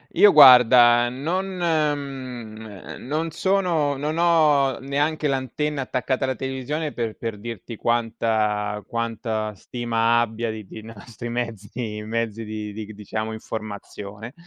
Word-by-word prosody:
Io 205 -1 +7
guarda, 125 -3 +8
non 165 +10 -2
mhmm, 130 - -3
non 160 +3 -1
sono 170 -6 +1
non 150 +3 -2
ho 150 -6 +3
neanche 145 +3 -1
l'antenna 140 +2 -2
attaccata 130 +1 -2
alla 130 -1 -1
televisione 135 +4 -3
per 115 -2 -3
per 115 -3 -4
dirti 115 +1 -7
quanta 110 -3 0
quanta 115 -2 -3
stima 120 +1 0
abbia 115 0 -2
di 110 -2 -8
di 110 - -10
nostri 115 +1 -9
mezzi 115 -2 -4
mezzi 115 0 -3
di 105 -1 -5
di 110 0 -6
g 110 - -10
diciamo 110 +2 -4
informazione; 110 +1 -7
120 Hz, 125 wpm, -23 LUFS, 110-140 Hz, -, guarda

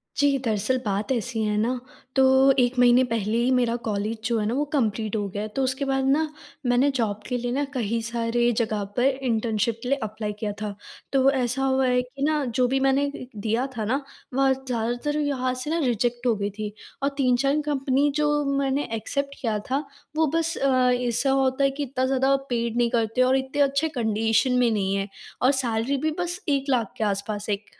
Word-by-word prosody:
जी, 285 -1 +3
दरअसल 220 +4 +1
बात 205 +5 -1
ऐसी 235 -2 -1
है 210 0 0
ना, 245 +4 0 0.4
तो 265 0 +6
1 245 +1 +2
महीने 245 +1 +6
पहले 225 -1 0
ही 240 +2 +2
मेरा 245 -2 +2
कॉलेज 210 +2 -1
जो 230 0 +1
है 210 - -1
ना, 220 - 0
वो 280 +3 +1
कंप्लीट 220 -5 0
हो 205 -2 -1
गया, 205 +2 -4
तो 240 +6 -2
उसके 265 +2 -1
बाद 270 -1 0
ना 310 +3 +3 0.4
मैंने 245 +3 +3
जॉब 220 -6 -1
के 250 - -1
लिए 245 0 -3
ना 280 +3 0
कही 230 -3 -1
सारे 235 +1 0
जगह 215 -3 0
पर 245 - +3
इंटर्नशिप 235 -4 0
के 250 - -3
लिए 280 - +2
अप्लाई 215 0 -4
किया 210 -1 -2
था। 210 -1 -4 0.4
तो 270 0 +5
ऐसा 260 0 0
हुआ 265 0 +2
है 250 0 +3
कि 255 +2 -7
ना 300 0 +2
जो 250 +1 +1
भी 265 +2 +1
मैंने 270 +1 +3
एक 285 - -4
एक 255 - -9
दिया 225 +4 0
था 220 - -1
ना, 260 +6 0 0.3
वहाँ 270 0 +3
ज़्यादातर 250 +2 -2
यहाँ 260 -3 0
से 255 +4 -5
ना 330 - 0
रिजेक्ट 240 +1 0
हो 235 - +3
गई 200 0 -2
थी। 210 -1 -4 0.3
और 280 - +3
3-4 275 +2 +2
कंपनी 280 -1 +1
जो 300 0 +2 0.3
मैंने 275 +1 0
एक्सेप्ट 280 +5 -3
किया 225 -5 0
था, 275 +3 0 0.3
वो 320 0 +3
बस 330 +1 0
अ, 255 -2 +3
ऐसा 245 +1 +1
होता 265 0 +2
है 275 - +5
कि 285 +2 -4
इतना 260 -1 -1
ज़्यादा 265 +1 +2
पेड 235 -1 -1
नहीं 240 -1 +3
करते 230 +1 +1
और 255 +1 +4
इतने 265 +2 -2
अच्छे 280 +3 +2
कंडीशन 225 -1 +1
में 245 -1 +4
नहीं 195 -2 0
है, 195 0 -1 0.3
और 255 - +5
सैलरी 255 0 0
भी 310 +3 0
बस 350 +1 -2
1 275 -1 +1
लाख 235 -6 +1
के - - -1
आसपास 205 +1 -2
1 205 0 -2
250 Hz, 210 wpm, -25 LUFS, 225-270 Hz, 0.4 s, तो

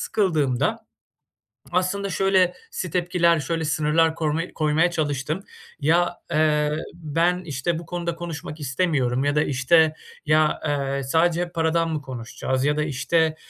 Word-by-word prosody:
sıkıldığımda 155 - +1 0.9
aslında 185 +3 0
şöylesi 195 - 0
tepkiler 175 -2 +2
şöyle 160 +3 -2
sınırlar 155 +2 +2
koyma 155 0 0
koymaya 155 +3 +2
çalıştım. 155 +3 -2 0.4
"Ya, 165 +4 +2
eee, 150 -1 +2 0.2
ben, 170 +2 0
işte, 160 +3 -2
bu 170 - -10
konuda 170 0 -3
konuşmak 165 -2 -7
istemiyorum." 135 -3 0
ya 145 +1 +1
da, 150 - +3
işte, 155 +4 +3 0.3
"Ya, 155 +1 +3
eee, 140 -2 -1
sadece 170 +5 +1
paradan 165 0 +1
mı 155 -2 -2
konuşacağız?" 130 +1 -3
ya 150 +1 +1
da, 150 - +1
işte, 155 +3 +1
160 Hz, 130 wpm, -23 LUFS, 145-175 Hz, 0.9 s, da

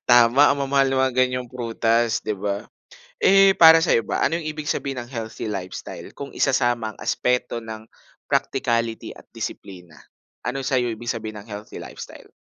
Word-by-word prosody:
Tama, 120 +4 +6
ang 140 - 0
mamahal 135 0 +2
na 135 0 +1
mga 130 - -2
ganyang 125 0 -4
prutas, 115 -1 0
‘di 105 - -1
ba? 100 +1 -3 0.6
Eh, 195 0 +6
para 165 0 +9
sa’yo 115 - +3
ba, - - 0
ano 165 +2 0
'yong 155 - -6
ibig 150 -1 -5
sabihin 135 -2 -3
ng 120 - -15
healthy 115 -2 -5
lifestyle 95 -2 -6
kung 140 - -7
isasama 120 -5 +1
ang - - -24
aspeto 125 -1 -1
ng 110 -1 -8 0.5
practicality 115 -1 -1
at - - -17
disiplina? 90 -5 -8 0.5
Ano 135 +2 -3
sa’yo 125 -2 +1
ibig 115 +1 -4
sabihin 110 -2 -6
ng 110 - -20
healthy 105 +1 -8
lifestyle? - - -11
120 Hz, 170 wpm, -23 LUFS, 110-135 Hz, 0.6 s, para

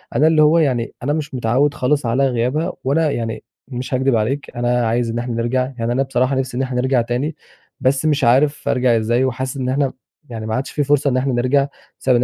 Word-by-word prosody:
أنا 155 - +4
اللي 160 -1 +4
هو 155 +2 +5
يعني 125 -6 0
أنا 145 - 0
مش 150 -2 -4
متعوّد 125 +4 +1
خالص 140 +1 0
على 130 +4 +2
غيابها 130 +8 -1
وأنا 150 +3 +1
يعني 115 -2 -4 0.2
مش 130 0 -5
هاكدب 130 -1 +2
عليك، 130 +6 -1
أنا 120 -1 +1
عايز 115 +1 0
إن 115 - -2
إحنا 120 0 -3
نرجع، 125 +3 0
يعني 115 +1 -1
أنا 130 +3 +1
بصراحة 130 0 0
نفسي 130 -2 -2
إن 130 - 0
إحنا 125 -1 -1
نرجع 130 -1 +2
تاني، 125 +6 -2 0.4
بس 135 +2 +1
مش 150 -2 +1
عارف 135 +5 +3
أرجع 125 -2 +3
إزاي؟ 120 +3 +1
وحاسس 130 +1 -3
إن 130 -1 -2
إحنا 135 0 0 0.4
يعني 110 -2 -6
ما 110 0 -2
عادش 135 - -3
في 145 - 0
فرصة 145 0 +2
إن 130 - 0
إحنا 130 0 0
نرجع 135 +3 +2 0.3
بسبب 130 -2 +2
إن 120 - +2
130 Hz, 225 wpm, -19 LUFS, 120-140 Hz, 0.4 s, هو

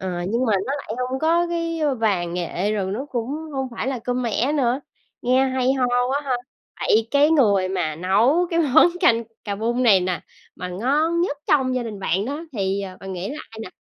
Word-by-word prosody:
Ờ, 190 - -3 0.2
nhưng 235 +4 0
mà 220 - +2
nó 270 - -1
lại 275 - -6
hông 255 +1 -2
có 335 +3 +2
cái 335 -1 -2 0.2
vàng 180 -6 0
nghệ 180 +3 -1
rồi 195 -2 -1
nó 265 +7 -4
cũng 235 -2 -2 0.3
hông 265 -1 -2
phải 235 - -4
là 260 -2 -2
cơm 245 +2 -2
mẻ 240 +4 0
nữa. 260 -2 +1 0.4
Nghe 255 +2 +3
hay 260 0 +1
ho 265 -2 +1
quá 245 +3 +1
ha! 260 -2 0 0.5
Vậy 225 +1 +2
cái 290 +2 +4
người 200 -11 +3
mà 170 -5 -2
nấu 235 - +3
cái 335 -1 +2
món 290 +1 +6
canh 235 -11 +4 0.2
cà 200 -2 -2
bung 235 +4 0
này 205 -6 +6
nè 180 -1 -2 0.4
mà 180 - -5
ngon 290 - +1
nhất 320 -5 0
trong 260 -3 +2
gia 250 - 0
đình 215 -3 -6
bạn 195 +1 0
đó 290 +4 -4
thì, 195 -2 -1
ờ, 185 -1 -7
bạn 195 0 -6
nghĩ 180 +1 -4
là 295 - -6
ai 225 - -11
nà? 185 - -8
245 Hz, 220 wpm, -22 LUFS, 195-275 Hz, 0.5 s, món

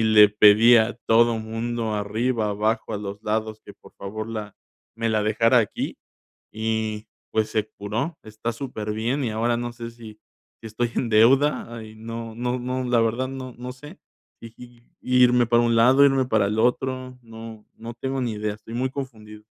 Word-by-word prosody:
y - - +2
le 110 -1 +7
pedí 105 +3 +6
a 115 +1 +2
todo 115 0 +4
mundo 115 0 -3
arriba, 110 +2 -1
abajo, 110 +2 -1
a - - -1
los 100 0 -7
lados, 110 0 -2
que - - -11
por - - -19
favor 110 +3 -6
la 105 -2 -6 0.4
me 115 0 -1
la 110 -1 +1
dejara 115 +3 +3
aquí 110 -4 -2 0.6
y, 110 -1 -3 0.2
pues, 110 0 0
se 110 -1 -1
curó, 110 +11 -3
está 110 +2 -5
súper 115 -4 -5
bien, 120 +6 -1
y 120 - -1
ahora 115 +2 0
no 120 0 -4
sé 120 -1 -7
si, 115 -2 -13 0.4
si 115 - -8
estoy 115 +2 -2
en 120 - -1
deuda, 120 +1 +3
y 110 0 -12
no 115 0 -7
no 125 +2 -2
no, 130 +1 -3
la 125 -1 +2
verdad 115 +3 0
no 130 -1 -7
no 125 +1 -6
sé 150 +8 -13 0.4
si 115 -1 -11 0.5
irme 125 -1 +4
para 120 0 +3
un 115 -1 +2
lado, 130 +5 +6
irme 135 -2 +3
para 110 -5 +2
el 105 +2 -1
otro, 130 +2 -1
no 115 -2 -11
no 115 +1 -8
tengo 135 +3 -3
ni 120 -3 -2
idea, 105 0 -3
estoy 105 +2 -12
muy 130 +2 0
confundido. 110 -6 -8
115 Hz, 185 wpm, -24 LUFS, 110-125 Hz, 0.6 s, le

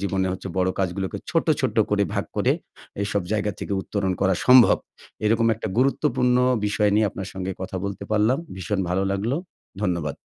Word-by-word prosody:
জীবনে 95 -1 0
হচ্ছে 95 +1 -6
বড় 90 0 +2
কাজগুলোকে 95 0 -2
ছোট্ট, - - +1
ছোট্ট - - -1
করে - - +3
ভাগ - - 0
করে, - - +3 0.5
এসব 100 -1 -1
জায়গা 105 -1 0
থেকে - - -4
উত্তরণ 100 -3 -1
করা 95 -1 +3
সম্ভব। 125 -2 +8 0.5
এরকম 115 +1 +3
একটা 110 0 -5
গুরুত্বপূর্ণ 130 -2 +2 0.3
বিষয় 105 0 +2
নিয়ে 105 -1 +3
আপনার 95 0 -6
সঙ্গে 95 0 -4
কথা 95 0 -4
বলতে 100 0 -4
পারলাম। 110 +5 +3 0.2
ভীষণ 95 +2 -2
ভালো 90 +2 +1
লাগলো। 110 +8 -1 0.5
ধন্যবাদ। 85 -6 -1
100 Hz, 170 wpm, -24 LUFS, 95-110 Hz, 0.5 s, সম্ভব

